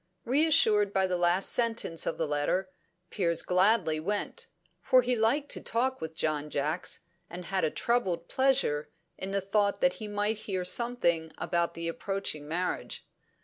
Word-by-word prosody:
Reassured 230 Hz, -7 st, +4 dB
by 190 Hz, -1 st, +3 dB
the 185 Hz, -1 st, 0 dB
last 175 Hz, +2 st, +2 dB
sentence 230 Hz, -8 st, -1 dB
of -, -, -1 dB
the 160 Hz, -, 0 dB
letter, 150 Hz, +6 st, -1 dB, 0.4 s
Piers 170 Hz, -5 st, 0 dB
gladly 180 Hz, -3 st, +3 dB
went; 205 Hz, +6 st, -3 dB, 0.3 s
for 255 Hz, -2 st, +4 dB
he 250 Hz, +1 st, +1 dB
liked 240 Hz, +6 st, +1 dB
to -, -, -1 dB
talk 260 Hz, +3 st, -1 dB
with 160 Hz, 0 st, -5 dB
John 150 Hz, -1 st, -1 dB
Jacks, 150 Hz, +5 st, -2 dB, 0.3 s
and 175 Hz, +1 st, -8 dB
had 190 Hz, 0 st, -1 dB
a 160 Hz, -, +3 dB
troubled 185 Hz, -6 st, 0 dB
pleasure 255 Hz, -, +1 dB, 0.3 s
in 190 Hz, -, -3 dB
the 195 Hz, 0 st, 0 dB
thought 200 Hz, +1 st, +1 dB
that 270 Hz, -, +3 dB
he 215 Hz, -, -4 dB
might 205 Hz, +1 st, -1 dB
hear 185 Hz, -2 st, -1 dB
something 180 Hz, -7 st, +1 dB
about 170 Hz, -1 st, -1 dB
the 165 Hz, 0 st, -3 dB
approaching 165 Hz, -4 st, -2 dB
marriage. 180 Hz, +4 st, -3 dB
190 Hz, 160 wpm, -29 LUFS, 165-225 Hz, 0.4 s, Reassured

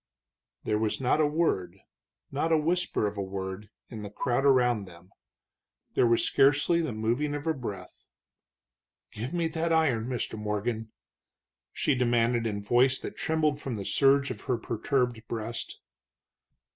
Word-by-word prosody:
There 105 Hz, 0 st, 0 dB
was 110 Hz, -1 st, -1 dB
not 135 Hz, +4 st, +2 dB
a 150 Hz, -, +4 dB
word, 100 Hz, -, 0 dB, 0.5 s
not -, -, 0 dB
the 165 Hz, -1 st, +3 dB
whisper 170 Hz, -5 st, 0 dB
of 105 Hz, 0 st, -3 dB
a -, -, 0 dB
word, 95 Hz, +1 st, -5 dB, 0.2 s
in 110 Hz, -3 st, -7 dB
the 105 Hz, -, -6 dB
crowd 120 Hz, +6 st, -1 dB
around 125 Hz, -6 st, +3 dB
them. 90 Hz, +1 st, -15 dB, 0.8 s
There 120 Hz, -, +4 dB
was 115 Hz, 0 st, +3 dB
scarcely 145 Hz, +5 st, +3 dB
the 160 Hz, -, -2 dB
moving 120 Hz, +7 st, -1 dB
of 145 Hz, -, -5 dB
a 160 Hz, -, +2 dB
breath. 120 Hz, -8 st, -8 dB, 1.0 s
"Give 115 Hz, +6 st, -5 dB
me 170 Hz, -1 st, 0 dB
that 165 Hz, +1 st, -1 dB
iron, 140 Hz, -9 st, +2 dB
Mr. 120 Hz, -3 st, -3 dB
Morgan!" 110 Hz, +1 st, -2 dB, 0.8 s
she 150 Hz, -, +1 dB
demanded 120 Hz, -2 st, +2 dB
in 100 Hz, -2 st, -3 dB
voice 125 Hz, +5 st, +3 dB
that -, -, -7 dB
trembled 155 Hz, -2 st, 0 dB
from 130 Hz, -4 st, -4 dB
the 100 Hz, -2 st, -5 dB
surge 140 Hz, 0 st, +3 dB
of 105 Hz, -, -7 dB
her 125 Hz, -3 st, 0 dB
perturbed 120 Hz, +1 st, -1 dB
breast. 115 Hz, 0 st, -5 dB
120 Hz, 155 wpm, -28 LUFS, 105-145 Hz, 1.0 s, a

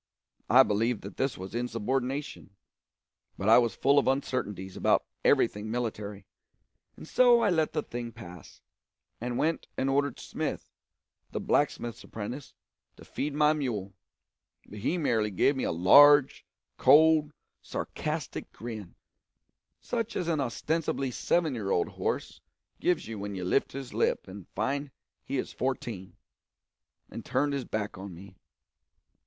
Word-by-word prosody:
I 130 Hz, +4 st, +8 dB
believed 115 Hz, +1 st, 0 dB
that 100 Hz, -1 st, -9 dB
this 135 Hz, -3 st, -1 dB
was 95 Hz, +1 st, -8 dB
insubordination, 125 Hz, 0 st, -3 dB, 0.8 s
but 100 Hz, -, -3 dB
I 115 Hz, -, +8 dB
was 120 Hz, -2 st, 0 dB
full 140 Hz, +1 st, +4 dB
of -, -, -1 dB
uncertainties 105 Hz, -8 st, -2 dB
about -, -, +2 dB, 0.2 s
everything 105 Hz, +1 st, +2 dB
military, 105 Hz, -4 st, -4 dB, 0.7 s
and -, -, -11 dB
so 245 Hz, +2 st, +5 dB
I 205 Hz, -, +3 dB
let 160 Hz, -3 st, +1 dB
the 150 Hz, -, -1 dB
thing 120 Hz, -1 st, -6 dB
pass, 90 Hz, -, -12 dB, 0.6 s
and 120 Hz, 0 st, -3 dB
went 160 Hz, +2 st, 0 dB
and 135 Hz, +1 st, +1 dB
ordered 140 Hz, -1 st, 0 dB
Smith, -, -, -4 dB, 0.6 s
the -, -, -4 dB
blacksmith's 120 Hz, -1 st, 0 dB
apprentice, 115 Hz, +3 st, -7 dB, 0.4 s
to -, -, -14 dB
feed 145 Hz, 0 st, -3 dB
the 150 Hz, 0 st, +4 dB
mule; 110 Hz, -10 st, -3 dB, 0.7 s
but 105 Hz, -, -10 dB
he 160 Hz, -, 0 dB
merely 115 Hz, -9 st, +1 dB
gave 120 Hz, +8 st, +2 dB
me 130 Hz, -, -2 dB
a -, -, 0 dB
large, 140 Hz, -, +6 dB, 0.3 s
cold, 155 Hz, +2 st, +6 dB, 0.3 s
sarcastic -, -, -4 dB
grin, 110 Hz, -5 st, -8 dB, 0.9 s
such 230 Hz, -2 st, -3 dB
as 180 Hz, -, -2 dB
an 165 Hz, -3 st, +1 dB
ostensibly 140 Hz, +2 st, -1 dB
seven 160 Hz, +4 st, +1 dB
year 105 Hz, -5 st, -3 dB
old 85 Hz, -, +1 dB
horse -, -, -3 dB, 0.4 s
gives 180 Hz, -9 st, 0 dB
you 110 Hz, -2 st, -6 dB
when 100 Hz, 0 st, -5 dB
you 90 Hz, -1 st, -4 dB
lift 115 Hz, -, +1 dB
his 135 Hz, -1 st, -7 dB
lip -, -, 0 dB
and 95 Hz, -1 st, -10 dB
find 140 Hz, +7 st, -1 dB, 0.3 s
he 140 Hz, -, -3 dB
is -, -, -3 dB
fourteen, 120 Hz, -7 st, -4 dB, 1.0 s
and -, -, -7 dB
turned 145 Hz, 0 st, 0 dB
his 135 Hz, -3 st, -2 dB
back 105 Hz, -3 st, -4 dB
on 95 Hz, -2 st, -8 dB
me. 95 Hz, +2 st, -13 dB
125 Hz, 145 wpm, -29 LUFS, 105-145 Hz, 1.0 s, I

